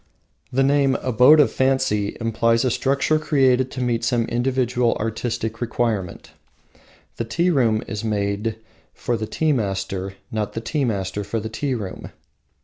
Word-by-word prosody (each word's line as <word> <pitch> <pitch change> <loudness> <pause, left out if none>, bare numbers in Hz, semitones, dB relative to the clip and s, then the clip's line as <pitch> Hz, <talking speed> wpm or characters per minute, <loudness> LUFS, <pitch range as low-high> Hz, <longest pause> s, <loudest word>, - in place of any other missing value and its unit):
The 135 +2 +2
name, 140 -1 +3
Abode 130 +5 +5
of 145 - +2
Fancy, 130 -6 0
implies 115 +1 +1
a 125 - +2
structure 140 +5 +1
created 130 -4 +2
to 130 - -4
meet 120 -1 0
some 115 0 +1
individual 125 0 0
artistic 115 +1 -3
requirement. 110 -6 -2 0.9
The - - -1
tea 170 +11 +1
room 115 -8 +2
is 105 0 -5
made 105 0 -1 0.4
for 120 - -2
the 110 -1 -4
tea 160 +6 0
master, 95 -5 -2 0.2
not 105 -2 -2
the - - -3
tea 140 +4 -1
master 100 -2 -2
for 105 +3 -3
the 110 +1 -5
tea 130 +4 -2
room. 100 -5 -6
115 Hz, 150 wpm, -22 LUFS, 110-130 Hz, 0.9 s, Abode